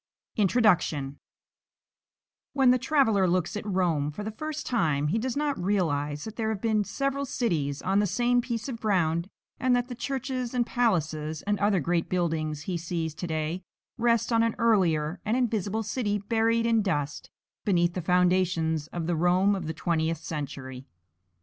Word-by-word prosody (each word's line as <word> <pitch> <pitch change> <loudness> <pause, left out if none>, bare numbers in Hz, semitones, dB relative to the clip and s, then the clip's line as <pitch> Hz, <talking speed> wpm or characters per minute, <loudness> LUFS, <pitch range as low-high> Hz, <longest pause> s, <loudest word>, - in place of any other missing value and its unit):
INTRODUCTION 175 - +2 1.3
When 270 -3 +5
the 255 - +3
traveller 240 -9 +3
looks 180 0 0
at 210 - -3
Rome 175 -7 +1
for 155 +8 -6
the 215 - -4
first 310 +7 -5
time 150 - +1
he 220 - +1
does 255 +3 -2
not 290 -9 -1
realize 150 -7 0
that 220 0 -8
there 220 -2 -1
have 220 -3 -2
been 215 -1 +1
several 275 +5 -2
cities 160 - -1
on 195 +2 +2
the 205 - +2
same 245 +5 +2
piece 235 -1 -4
of 240 -4 -5
ground, 175 -4 +1 0.3
and 255 -1 +3
that 245 +1 -1
the - - -4
churches 255 -1 -3
and 240 -1 +2
palaces 160 - 0
and 205 -1 0
other 200 -1 +3
great 170 +2 0
buildings 155 -4 -1
he 180 +1 -2
sees 165 -1 -3
to 175 - -5
day 160 +2 -2 0.3
rest 235 0 +1
on 225 - +4
an 230 0 +1
earlier 180 -8 +2
and 220 +3 0
invisible 220 -3 0
city 215 -1 -1
buried 225 +3 +1
in 230 -1 +3
dust 145 -7 -2 0.3
beneath 175 -3 +2
the 180 - -3
foundations 175 -3 +2
of 170 0 -4
the 175 +1 0
Rome 180 +4 +3
of 185 -5 -3
the - - -1
Twentieth 165 -1 0
Century. 140 -4 -6
190 Hz, 170 wpm, -27 LUFS, 160-230 Hz, 1.3 s, When